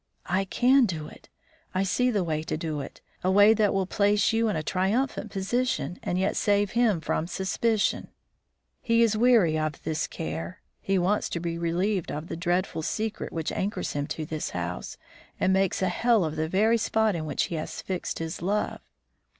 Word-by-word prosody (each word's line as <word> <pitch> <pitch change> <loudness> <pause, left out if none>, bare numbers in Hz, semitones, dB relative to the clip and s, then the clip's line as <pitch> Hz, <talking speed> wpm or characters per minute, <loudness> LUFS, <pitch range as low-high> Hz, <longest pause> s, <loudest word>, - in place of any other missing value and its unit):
"I 190 +2 0
can 250 +5 +4
do 160 -5 -4
it; - - -15 0.5
I 185 - +2
see 250 +6 +1
the 205 -6 +1
way 155 -2 -1
to 155 - -3
do 155 -2 -3
it - - -10 0.2
a 185 - +2
way 205 +3 +7
that 215 -2 +2
will 195 -1 +1
place 205 +2 +2
you 225 0 +2
in 210 - 0
a 155 - -2
triumphant 195 - 0
position, 195 - -1
and 175 - -2
yet 190 +2 +1
save 205 -1 +2
him 225 -7 +2
from 160 0 -1
suspicion. 200 +4 0 0.7
He 230 -1 +3
is 220 -2 +2
weary 215 -9 +4
of 155 -2 -3
this 155 -1 -1
care. 165 +3 -5 0.2
He 195 0 +1
wants 190 +4 +1
to 170 - -3
be 170 0 -3
relieved 175 +3 -1
of 155 +3 -5
the - - -3
dreadful 175 0 -1
secret 215 +6 -3
which 160 -2 -3
anchors 200 +3 -2
him 145 0 -2
to 155 - -4
this 155 0 -4
house, 90 0 -4 0.4
and 190 - +3
makes 190 0 +1
a 185 - +2
hell 225 +1 +2
of 155 0 -3
the 160 0 -1
very 220 +6 +3
spot 220 -2 +1
in 155 -2 -4
which - - 0
he 170 - -3
has 155 - -5
fixed 185 -2 -3
his 165 0 -5
love. 205 +4 -1
190 Hz, 195 wpm, -27 LUFS, 165-215 Hz, 0.7 s, way